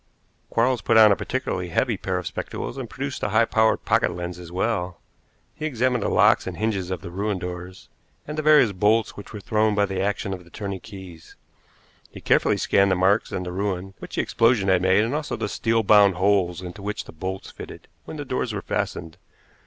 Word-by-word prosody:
Quarles 120 0 +1
put 115 +2 +3
on 110 -2 +8
a - - +4
particularly 105 -8 -3
heavy 85 - 0
pair - - -3
of - - -5
spectacles - - -5
and 130 -4 -6
produced 135 0 -5
a - - -1
high 110 +3 +4
power 110 -1 +2
pocket - - +1
lens 90 0 -6
as 85 -1 -10
well. 90 -2 -2 0.5
He 155 0 -4
examined 125 -3 0
the - - 0
locks - - +4
and - - -5
hinges 100 -5 -1
of 95 - -4
the 85 - -8
ruined 100 0 -2
doors, 90 0 -7 0.4
and 150 - -5
the 155 - -1
various 150 -7 +5
bolts 105 +3 +1
which 100 - -10
were 105 - -7
thrown 110 +1 +1
by 100 0 +3
the 95 -1 -3
action 100 0 -1
of 90 -2 -7
the 85 - -19
turning 100 0 -5
keys. 95 -6 -12 0.7
He - - -11
carefully - - +2
scanned 100 0 +3
the 95 - +2
marks 95 +4 +2
and 90 - -3
the 90 - -5
ruin 95 0 -3
which - - -8
the - - +1
explosion 115 -4 +2
had 95 -1 +3
made, 95 +3 +4
and 115 +4 -2
also 150 0 -2
the - - -3
steel 115 0 0
bound 100 -2 +6
holes 95 -2 +1
into 90 +3 -8
which 105 +1 -4
the - - -11
bolts 95 +4 -6
fitted - - -11 0.2
when 155 - -8
the 145 - -5
doors 125 -3 -2
were 100 - -4
fastened. 80 +1 -3
100 Hz, 215 wpm, -24 LUFS, 90-115 Hz, 0.7 s, on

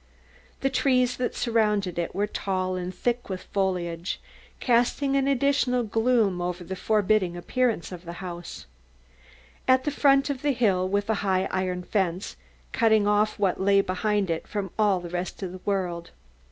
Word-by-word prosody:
The 270 - +1
trees 255 -2 +2
that 250 - -2
surrounded 210 -6 +1
it 170 - -3
were 200 +2 +1
tall 185 -3 -2
and 180 0 -3
thick 240 +6 -1
foliaged, 185 -3 -2 0.4
casting 250 +3 +2
an 275 0 +2
added 255 -4 +1
gloom 225 -6 +2
over 175 0 -3
the 190 +2 -5
forbidding 205 -3 +1
appearance 230 0 -1
of 180 -1 -8
the 170 - -6
house. 175 -1 -7 1.0
At 260 0 +5
the 295 - -1
foot 275 0 +3
of 265 -2 -5
the 290 -1 +1
hill 195 -6 +1
was 205 +1 0
a 220 - +2
high 190 -1 +1
iron 185 -1 -1
fence, 185 -2 -1 0.4
cutting 220 -2 +3
off 210 +1 +2
what 190 -2 0
lay 200 0 +4
behind 195 0 0
it 165 - -3
from 200 -4 -4
all 200 -4 +3
the 175 - -7
rest 180 +2 -4
of 185 - -4
the 185 0 -10
world. 180 -4 -2
200 Hz, 165 wpm, -26 LUFS, 185-240 Hz, 1.0 s, At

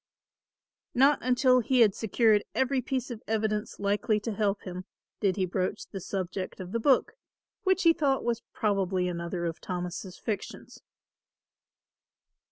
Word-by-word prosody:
Not 275 +4 +5
until 255 +1 +4
he 250 +1 +2
had 210 -4 +6
secured 220 0 +3
every 265 0 +1
piece 255 0 -3
of 230 -2 -6
evidence 215 0 -1
likely 205 +2 +1
to 225 - -3
help 205 -1 0
him, 185 0 -6 0.3
did 195 -4 +1
he 190 - +1
broach 185 +3 -2
the 195 - -5
subject 185 +1 -4
of 185 -1 -7
the 230 - 0
book, 260 +2 +3 0.5
which 380 0 +3
he 335 -1 +7
thought 275 -4 +1
was 235 -1 -1
probably 190 -3 0
another 170 0 -3
of 165 -1 -4
Thomas' 180 +1 -5
fictions. 215 -3 -6
210 Hz, 145 wpm, -28 LUFS, 185-245 Hz, 0.5 s, he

